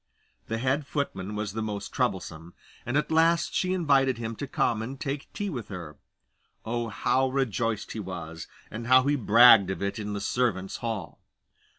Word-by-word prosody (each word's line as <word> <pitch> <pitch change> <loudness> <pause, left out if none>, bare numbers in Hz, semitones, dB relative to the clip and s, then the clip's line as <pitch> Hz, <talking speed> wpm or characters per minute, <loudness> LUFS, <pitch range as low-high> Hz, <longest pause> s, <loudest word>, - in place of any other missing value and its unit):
The 115 - -2
head 135 +4 0
footman 105 -8 -3
was 105 -2 -3
the 110 - -3
most 105 -2 -4
troublesome, 80 +2 -3 0.3
and 120 +4 +1
at 150 - -1
last 165 +1 +3
she 185 - 0
invited 140 -8 +2
him 115 -1 -4
to 140 - -4
come 115 -4 0
and 130 +4 -6
take 140 +1 -4
tea 205 - -4
with 120 -7 -5
her. 85 -7 -8 0.7
Oh, 120 0 -2
how 130 +6 +1
rejoiced 115 -5 -1
he 110 - -5
was, 85 -4 -7 0.2
and 115 +2 -6
how 130 +1 +6
he 145 +2 +2
bragged 115 -4 +7
of 95 +1 -3
it 100 +3 -2
in 105 -1 -4
the 100 - -3
servants' 100 -3 -1
hall! 110 -8 -5
115 Hz, 180 wpm, -27 LUFS, 100-135 Hz, 0.7 s, bragged